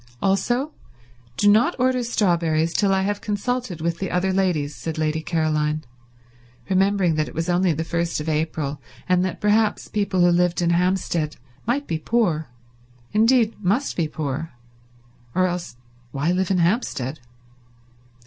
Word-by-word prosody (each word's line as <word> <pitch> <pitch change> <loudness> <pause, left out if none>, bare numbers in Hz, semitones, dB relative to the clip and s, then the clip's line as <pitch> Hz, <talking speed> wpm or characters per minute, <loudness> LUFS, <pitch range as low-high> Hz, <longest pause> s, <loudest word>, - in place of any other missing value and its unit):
"Also 240 +9 0 0.6
do 205 - +3
not 225 +12 +5
order 255 0 +2
strawberries 170 -7 +1
till 200 -1 +2
I 190 0 +2
have 205 +1 -1
consulted 210 -3 -2
with 170 +1 -1
the 190 - -2
other 190 +1 0
ladies," 165 -7 0
said 160 +7 -5
Lady 155 0 0
Caroline, 155 -1 0 0.8
remembering 190 -2 +2
that 155 0 0
it - - -10
was 165 +3 -2
only 180 0 +3
the 160 +1 -1
first 170 0 -1
of 150 - -5
April, 150 -2 -2 0.3
and 180 -1 +3
that 185 - -3
perhaps 210 +1 +2
people 200 -3 0
who 175 0 +5
lived 175 0 +2
in 170 -1 +2
Hampstead 175 -3 0 0.3
might 275 +5 0
be 160 -2 -2
poor; 170 -6 0 0.6
indeed, 225 +1 +4
must 225 +10 +1
be 165 -3 0
poor, 150 0 -4 0.8
or 185 -1 +2 0.5
why 140 +7 -1
live 185 0 0
in 190 - +2
Hampstead? 170 - 0
180 Hz, 150 wpm, -23 LUFS, 160-205 Hz, 0.8 s, not